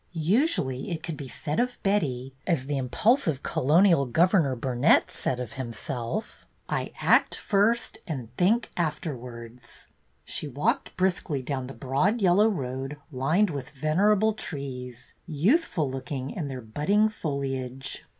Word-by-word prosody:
Usually 165 - +1
it 165 -2 -4
could 165 -2 -4
be 140 -2 -7
said 150 +3 -3
of 245 0 0
Betty, 135 -11 0
as 165 -8 +1
the 145 +1 -2
im 130 -2 -2
pulsive 210 - +2
colonial 165 0 +4
governor 165 - +3
Burnet 125 +4 +3
said 125 - -2
of 125 -1 -5
him 120 -2 -5
self: 135 - -5 0.2
"I - - -2
act - - +4
first 215 +4 +1
and 125 -7 -6
think 220 - +2
afterwards." 125 -7 -5 0.4
She - - -1
walked - - -1
briskly 175 -7 0
down 130 -1 -3
the 135 - -9
broad 145 - +1
yellow 200 +2 +5
road, 135 -5 -4
lined 155 +10 +2
with 140 -4 -5
venerable 195 +9 +2
trees, 125 - -6
youthful 170 - +1
looking 135 0 -4
in 160 -7 -4
their 130 -2 -5
budding 150 - +2
foliage. 135 - -4
145 Hz, 140 wpm, -27 LUFS, 130-190 Hz, 0.4 s, yellow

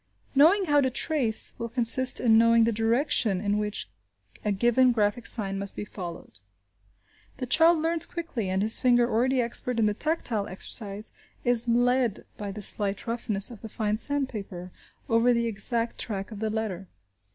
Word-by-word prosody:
"Knowing 335 +8 +5
how 290 -3 +3
to 260 - +1
trace 255 -4 0
" - - -33
will 230 - -4
consist 250 +2 +5
in 225 -2 +3
knowing 230 0 +5
the 230 - +2
direction 225 -2 +1
in 205 +1 -1
which 210 0 -3 0.6
a 210 - 0
given 240 +5 +3
graphic 220 +1 0
sign 195 -4 -2
must 200 0 -4
be - - -5
followed. 170 - -9 1.0
The 255 - -4
child 325 +6 +4
learns 325 +1 +1
quickly, 300 - -5
and 190 +1 0
his 220 +1 +3
finger, 245 -1 +3
already 250 +3 +1
expert 240 +1 -3
in 225 - +2
the 210 - +1
tactile 235 -6 -2
exercise, 200 +2 -5 0.3
is 240 -1 0
led, 245 -1 +1
by 205 -1 -6
the 205 +1 -7
slight 200 0 +1
roughness 230 -3 -2
of 225 - -12
the 220 - -8
fine 215 -1 -2
sandpaper, 215 -9 -3 0.4
over 230 +2 +3
the 235 0 0
exact 230 +2 -2
track 200 -1 -4
of 210 - -8
the 220 0 -2
letter. 210 -4 -4
230 Hz, 175 wpm, -26 LUFS, 205-250 Hz, 1.0 s, Knowing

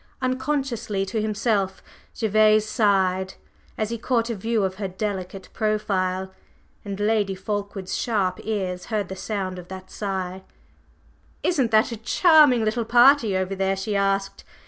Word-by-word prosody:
Unconsciously 255 -6 -1
to 215 +3 -2
himself, 210 -3 -1 0.4
Gervase 215 0 +4
sighed 190 -4 +1 0.4
as 215 0 -2
he 235 - -3
caught 235 -1 0
a - - -2
view 220 +1 0
of 190 0 -2
her 200 -1 -3
delicate 190 -1 -5
profile, 190 -3 -1 0.5
and 200 -1 -6
Lady 205 -2 +1
Fulkeward's 200 -1 -4
sharp 195 -6 0
ears 185 -4 -3
heard 210 -5 -2
the 190 - -5
sound 190 -2 -4
of 175 - -11
that 185 0 -9
sigh. 190 -2 -4 1.0
"Isn't 275 -9 +2
that 220 +2 +3
a 230 - -4
charming 290 - +5
little 225 +2 0
party 240 -3 +5
over 185 +1 -2
there?" 195 0 0
she 195 +2 -3
asked. 195 0 0
205 Hz, 145 wpm, -24 LUFS, 190-225 Hz, 1.0 s, charming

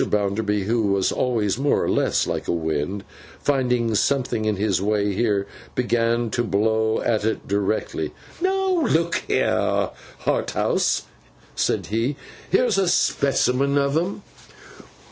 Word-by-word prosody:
Bounderby, 105 0 0
who 110 +1 +1
was 100 -1 +1
always 115 -4 0
more 145 +1 +2
or - - -1
less - - +1
like - - -3
a - - +1
Wind, 80 +3 -2 0.4
finding 125 -5 +1
something 125 -1 +1
in 110 -1 +1
his 100 -1 0
way 105 0 +1
here, 100 -2 +1 0.3
began 115 -1 +1
to 120 - 0
blow 110 +1 +1
at 110 -3 0
it 110 +1 -2
directly. 100 +1 -1 0.3
'Now, 380 -2 +1
look 170 -1 +2
here, - - +1 0.3
Harthouse,' - - +1 0.5
said - - 0
he, 115 +6 0 0.3
'here's 195 0 +3
a 190 - +2
specimen 140 -3 +2
of 140 0 +1
'em. 185 +5 -1
115 Hz, 130 wpm, -23 LUFS, 105-140 Hz, 0.5 s, here's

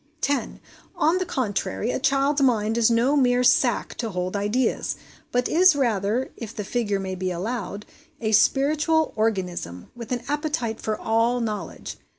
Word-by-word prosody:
10. 285 0 -1 0.4
On 330 +4 +2
the 370 - -2
contrary, 230 - -2
a - - -2
child's 275 +2 +2
mind 225 -4 +2
is 235 -1 +4
no 235 +5 +2
mere 250 -3 +3
sac - - +2
to 230 - -4
hold 180 0 -3
ideas; 210 +5 0 0.4
but 245 0 +1
is 365 0 +5
rather, 230 -2 0
if 230 -2 -8
the 210 - -3
figure 205 -2 -1
may 190 -1 -4
be 185 0 -3
allowed, 205 +3 -4 0.3
a 220 -2 -1
spiritual 300 +7 +3
organism, 180 - -2
with 235 -1 -9
an 245 -1 -2
appetite 295 -6 -2
for 215 -1 -2
all 230 +2 +1
knowledge. 210 -7 -5
235 Hz, 160 wpm, -24 LUFS, 210-270 Hz, 0.4 s, is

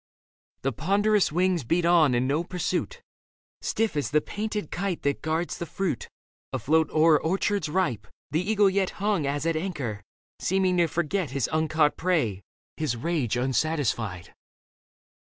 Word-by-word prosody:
The 135 - +1
ponderous 200 - +2
wings 180 -1 +1
beat 170 +8 +1
on 165 -7 +5
and 125 +2 +1
no 150 +5 +1
pursuit: 330 - -3 0.6
Stiff 225 -6 -1
as 145 - -1
the 150 - +3
painted 210 0 -4
kite 185 -1 -2
that 140 0 0
guards 160 +2 -2
the 170 - -4
fruit. 190 - -3 0.4
Afloat 160 +1 +2
o'er 155 -1 +4
orchards 195 +1 0
ripe, 135 - -1 0.2
the 160 - +1
eagle 205 +1 +3
yet 190 -1 +1
Hung 200 -7 0
as 145 +2 -2
at 165 -1 +1
anchor, 145 - -3 0.4
seeming 185 -1 +1
to 170 -1 +4
forget 170 +1 -1
His 135 -2 -1
uncaught 155 -1 +2
prey, 150 - 0 0.4
his 150 -6 -1
rage 140 -5 -1
unsatisfied. 125 - -1
160 Hz, 145 wpm, -26 LUFS, 145-185 Hz, 0.6 s, on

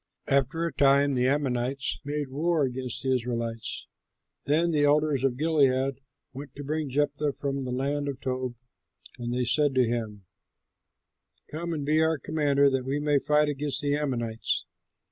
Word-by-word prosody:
After 140 +5 +1
a 170 - -3
time 140 0 +4
the 125 0 +2
Ammonites 135 -1 0
made 145 -1 -3
war 160 +2 +1
against 130 -1 -3
the 130 0 +2
Israelites. 115 -2 -3 0.6
Then 165 +4 +2
the 150 -2 +2
elders 145 -2 +3
of 130 -2 +1
Gilead 135 -3 +2 0.3
went 140 +2 -9
to 145 - -7
bring 155 +1 -2
Jephthah 145 +1 0
from 140 -1 -3
the 125 - -4
land 140 +3 -1
of 135 -2 -4
Tob, 130 -2 -3 0.6
and 120 0 -3
they 125 0 0
said 135 +3 +2
to 130 -1 +4
him, 110 -4 -3 1.3
"Come 170 +3 -4
and 150 -4 -3
be 155 +2 +3
our 160 0 +2
commander, 140 -1 +2
that 135 -1 0
we 135 +3 -1
may 145 -1 +2
fight 150 +2 +2
against 145 0 -2
the 145 0 +1
Ammonites." 120 -6 -1
140 Hz, 165 wpm, -27 LUFS, 130-150 Hz, 1.3 s, time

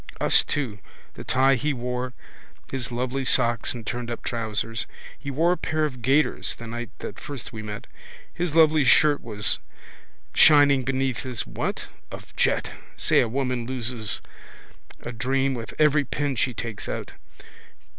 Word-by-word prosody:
Us - - +4
too: 125 -9 -3 0.3
the - - -9
tie 135 +1 +3
he 145 +3 0
wore, 125 0 -3 0.6
his 130 -1 -3
lovely 130 +3 -2
socks 120 -3 +3
and 115 -2 -8
turnedup 120 +1 -4
trousers. 115 -1 -2 0.3
He 140 - -8
wore 160 +6 +2
a 180 - +1
pair 155 -1 0
of 130 -5 -5
gaiters 135 +6 +2
the 115 - -9
night 120 +1 -5
that - - -6
first 140 -5 -7
we 110 - -5
met. 105 -1 -6 0.5
His 175 -3 -2
lovely 155 -2 +6
shirt 145 +2 +5
was 105 -3 0 0.7
shining 145 -3 +6
beneath 130 -1 -1
his 125 -5 -4
what? - - -3 0.2
of - - -11
jet. - - +1 0.3
Say - - +3
a 120 - +2
woman 125 -1 -1
loses 120 -4 0 0.8
a 120 - -6
charm 135 +3 0
with 115 -4 -5
every 150 -1 +4
pin 140 +1 -2
she 125 +1 0
takes 115 -3 -5
out. - - -4
130 Hz, 155 wpm, -25 LUFS, 115-140 Hz, 0.8 s, lovely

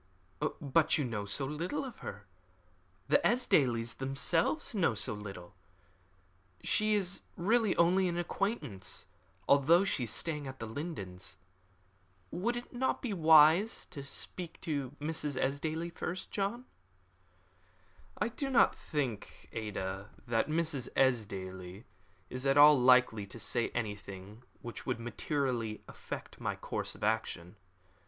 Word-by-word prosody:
"But 155 +1 +3
you 145 - 0
know 110 -4 -3
so 120 +7 0
little 170 - -3
of 255 - -9
her. 100 0 -7 0.8
The - - +5
Esdailes 125 - +2
themselves 145 - 0
know 170 - +2
so 105 0 -1
little. 100 -3 -8 1.1
She 215 0 +2
is 195 -2 -1 0.2
really 215 +3 +2
only 180 +2 +4
an 175 -1 -1
acquaintance, 170 - -3 0.4
although 160 +7 +5
she 135 -10 0
is - - -5
staying 150 +4 -2
at 130 0 -7
The 115 - -5
Lindens. 100 - -5 0.9
Would 235 +7 -1
it 240 - -7
not 260 +2 0
be 235 -5 -1
wise 160 +4 +6
to 145 -6 -6
speak 170 +4 -5
to 145 -4 -2
Mrs. 150 -2 -2
Esdaile 160 +5 -1
first, 180 +2 -4
John?" 210 +5 -2 1.5
"I 215 - 0
do 275 +4 -3
not 260 - +5
think, 130 - -4
Ada, 100 -2 -4 0.2
that 115 +3 +1
Mrs. 155 -5 0
Esdaile 95 -6 0 0.4
is 130 +2 -4
at 135 +1 +4
all 145 -1 +9
likely 125 -5 +5
to 100 - -9
say 115 +2 -1
anything 105 -2 -5 0.2
which 120 -3 -7
would - - -1
materially 120 -2 -2
affect - - -8
my - - -1
course - - -4
of - - -10
action. 105 -4 -1
140 Hz, 130 wpm, -32 LUFS, 110-170 Hz, 1.5 s, all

